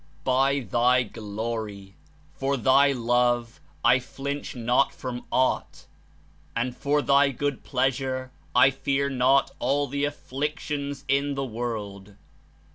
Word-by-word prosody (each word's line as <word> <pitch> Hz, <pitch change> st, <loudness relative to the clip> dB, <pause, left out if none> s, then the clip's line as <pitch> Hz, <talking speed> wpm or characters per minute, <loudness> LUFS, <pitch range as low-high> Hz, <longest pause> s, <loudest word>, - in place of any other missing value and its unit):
By 135 Hz, +2 st, +2 dB
Thy 125 Hz, +1 st, +3 dB
Glory! 105 Hz, -2 st, -5 dB, 0.4 s
for 135 Hz, +1 st, -1 dB
Thy 135 Hz, +3 st, +5 dB
Love 120 Hz, -1 st, +1 dB, 0.3 s
I 125 Hz, +1 st, +6 dB
flinch 140 Hz, +2 st, -5 dB
not 120 Hz, +3 st, +1 dB
from 125 Hz, -1 st, -6 dB
aught, 130 Hz, 0 st, 0 dB, 0.7 s
and 120 Hz, +1 st, -1 dB
for 145 Hz, +1 st, 0 dB
Thy 140 Hz, 0 st, +4 dB
good 140 Hz, +1 st, -3 dB
pleasure 130 Hz, -1 st, -1 dB, 0.2 s
I 135 Hz, +2 st, +7 dB
fear 140 Hz, +1 st, -1 dB
not 135 Hz, +1 st, +3 dB
all 140 Hz, +3 st, +1 dB
the 140 Hz, +1 st, -1 dB
afflictions 145 Hz, 0 st, -4 dB
in 140 Hz, +1 st, +1 dB
the 135 Hz, 0 st, -2 dB
world. 105 Hz, -4 st, -5 dB
130 Hz, 120 wpm, -26 LUFS, 120-140 Hz, 0.7 s, I